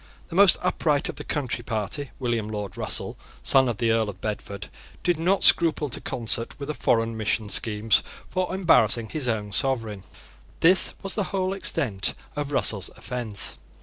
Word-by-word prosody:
The 170 - -7
most 195 -1 +8
upright 150 -5 +1
of - - -6
the - - -6
Country 130 -4 -2
Party, 115 +5 -2
William 120 -4 -2
Lord 105 -3 -5
Russell, - - -3 0.2
son 130 -2 +4
of 115 - -3
the 115 0 +1
Earl 110 -2 +1
of 95 -2 -9
Bedford, 100 -2 -5 0.4
did 175 -3 +1
not 185 +4 +1
scruple 160 -3 +5
to - - -4
concert 115 -1 -1
with 140 +1 -4
a - - -4
foreign 115 -4 +1
mission 110 0 -1
schemes 105 0 +1 0.3
for 185 -1 -2
embarrassing 120 - +3
his 150 -5 -1
own 105 -3 -2
sovereign. 115 -5 -1 0.6
This 185 +3 +6
was 195 - 0
the 205 - +1
whole 190 0 -1
extent 130 - -1 0.2
of 145 -1 -3
Russell's 100 -8 0
offence. 120 -5 -4
120 Hz, 170 wpm, -25 LUFS, 110-160 Hz, 0.6 s, most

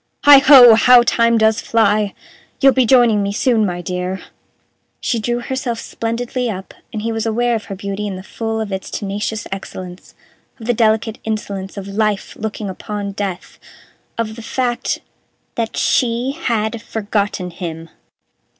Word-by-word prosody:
"Heigho! 275 -4 +9
How 245 +2 +6
time 230 -1 +3
does 220 0 +3
fly! 210 -2 +1 0.4
You'll 270 -1 +6
be 260 -3 +2
joining 240 -5 +5
me 200 0 -1
soon, 220 0 +2
my 175 -1 -4
dear." 180 +1 -3 0.8
She 240 -5 -1
drew 240 +2 -2
herself 255 -2 -3
splendidly 240 +2 -3
up, 190 -3 -6 0.2
and 215 -1 -5
he 230 - -1
was 225 0 -2
aware 240 +2 +1
of 220 -1 -2
her 195 - -6
beauty 200 +2 -4
in 195 - -4
the 185 - -8
full 225 +2 -4
of 215 -2 -4
its 190 0 -4
tenacious 210 +2 -4
excellence 185 -2 -8 0.4
of 225 - -9
the 245 - +2
delicate 220 -1 +1
insolence 200 -3 -4
of 195 -1 -6
Life 210 0 -1
looking 215 -1 -5
upon 200 +1 -5
Death 195 -3 -5 0.6
of 220 -1 -3
the 230 - -9
fact 240 +1 -2 0.5
that 230 -1 -3
she 245 +1 +1
had 230 -7 -2
forgotten 205 -4 -2
him. 165 -2 -6
220 Hz, 155 wpm, -18 LUFS, 200-235 Hz, 0.8 s, Heigho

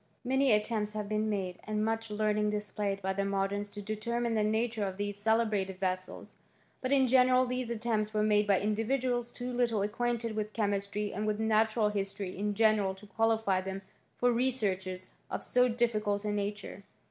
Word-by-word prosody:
Many 265 +1 +3
attempts 210 0 +1
have 210 -1 -3
been 215 +1 0
made, 190 -3 -2
and 215 0 -1
much 225 0 -1
learning 210 0 +1
displayed 205 -1 -2
by 190 0 0
the 200 - -1
modems 200 +1 -1
to 205 - -6
determine 230 +3 -2
the 215 -1 +2
nature 220 +1 0
of 190 -1 -3
these 205 0 -2
celebrated 205 -3 +1
vessels; 185 0 -4 0.4
but 255 - -2
in 270 -1 +5
general 255 0 +5
these 250 -1 -2
attempts 220 -2 -1
were 215 -1 +1
made 210 -1 +3
by 195 -2 +4
individuals 240 +3 0
too 250 0 -5
little 235 -4 +1
acquainted 230 +1 -1
with 215 0 -3
chemistry 205 -1 -1
and 215 +1 -2
with 210 0 0
natural 220 0 +2
history 195 -2 -3
in 205 +1 -2
general 215 -3 +3
to 195 +2 -14
qualify 220 -3 +1
them 190 +1 -5 0.3
for 245 0 +3
researches 190 -7 -1 0.2
of - - -3
so 250 0 +3
difficult 215 -4 0
a 210 - 0
nature. 205 -1 -4
215 Hz, 175 wpm, -31 LUFS, 200-230 Hz, 0.4 s, in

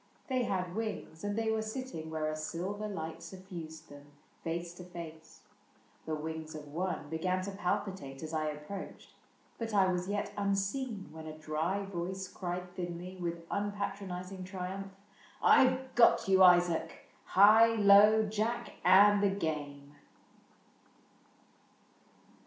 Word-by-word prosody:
They 255 -2 +1
had 185 -4 -2
wings, 215 -7 -4
And 205 +1 -2
they 225 -1 +1
were 220 0 0
sitting 220 -8 -5
where 155 -1 -2
a 155 - -2
silver 180 +7 -4
light 160 -6 -5
SufRised 170 -4 -9
them, 145 0 -13 0.4
face 170 +1 -3
to 180 - -10
face. 165 -3 -10 0.7
The 155 - -1
wings 160 0 -6
of 150 -1 -8
one 175 +1 -3
Began 185 +3 0
to 200 - -4
palpitate 190 -8 -3
as 160 +1 -6
I 155 -1 0
approached. 150 +6 -7 0.5
But 225 -2 -3
I 190 -2 +4
was 180 +1 -2
yet 205 0 -2
unseen 200 - -1
when 160 0 -9
a 155 0 -8
dry 160 +6 -2
voice 190 0 -4
Cried 180 0 -5
thinly, 180 +1 -6
with 170 -1 -4
unpatronizing 195 -2 -4
triumph, 190 +1 -5 0.3
'' - - -25
I 260 - +7
've 260 0 -5
got 235 -4 +5
you, 190 0 +5
Isaac; 175 -2 +4 0.2
high, 220 +3 +6
low, 210 +1 +7
jack, 225 +3 -2
and 200 +3 +7
the 200 - +4
game." 145 -6 -4
185 Hz, 140 wpm, -32 LUFS, 160-205 Hz, 0.7 s, I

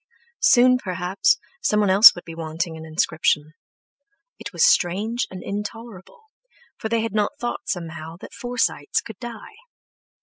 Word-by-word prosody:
Soon 255 -4 +5
perhaps, 185 -2 0 0.2
someone 210 -2 +2
else 200 +4 +9
would 175 - -9
be 165 - -8
wanting 165 +1 -4
an 160 0 -9
inscription. 155 -1 0 0.9
It - - -7
was - - +3
strange 215 - +1
and 185 - -9
intolerable, 210 - -7 0.6
for 220 - -4
they 230 0 +1
had 225 -2 -3
not 215 +7 -1
thought 240 0 -4
somehow, 165 -2 -5
that - - -12
Forsytes 245 -12 -1
could 220 -4 -11
die. 240 - -9
200 Hz, 140 wpm, -22 LUFS, 170-230 Hz, 0.9 s, else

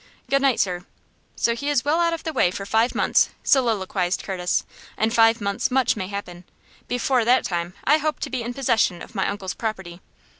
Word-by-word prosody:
"Good 275 0 +3
night, 270 -4 +2
sir." 180 -2 0 0.5
"So 235 - +1
he 280 +5 -3
is 280 -3 +1
well 305 +3 +2
out 340 -1 +2
of 330 - -4
the 320 - -3
way 220 -9 +3
for 195 +2 -6
five 225 +4 +1
months!" - - +3
soliloquized 195 -8 +1
Curtis. 180 -2 -1 0.3
"In 220 +1 +1
five 225 0 +4
months 200 -1 -1
much 260 -1 +2
may 190 -4 -4
happen. 185 -3 -7 0.4
Before 245 0 +1
that 250 +3 +3
time 175 0 -3
I 300 +3 +4
hope 310 0 -2
to - - -4
be 255 -2 -2
in 240 +1 -5
possession 230 -9 +1
of - - -13
my 195 -3 0
uncle's 200 -2 -4
property. 190 -6 -5
225 Hz, 200 wpm, -23 LUFS, 190-260 Hz, 0.5 s, five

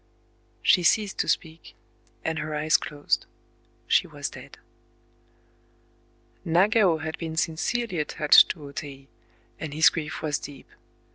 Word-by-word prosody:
She 180 - +5
ceased 205 +3 +1
to - - 0
speak; 160 0 -3 0.5
and 160 0 -1
her 155 0 -4
eyes 155 +1 +1
closed. 145 -1 -1 0.6
She - - +2
was - - -6
dead. - - -12 1.9
Nagao 185 +1 +3
had 160 0 -6
been 160 -1 -5
sincerely 175 +5 -1
attached 150 0 +5
to 155 - -6
O - - -10
Tei; 135 -1 -8 0.5
and 150 -2 -6
his 160 +1 +6
grief 155 -2 -5
was 150 -2 -1
deep. 140 -2 -11
160 Hz, 130 wpm, -25 LUFS, 150-170 Hz, 1.9 s, his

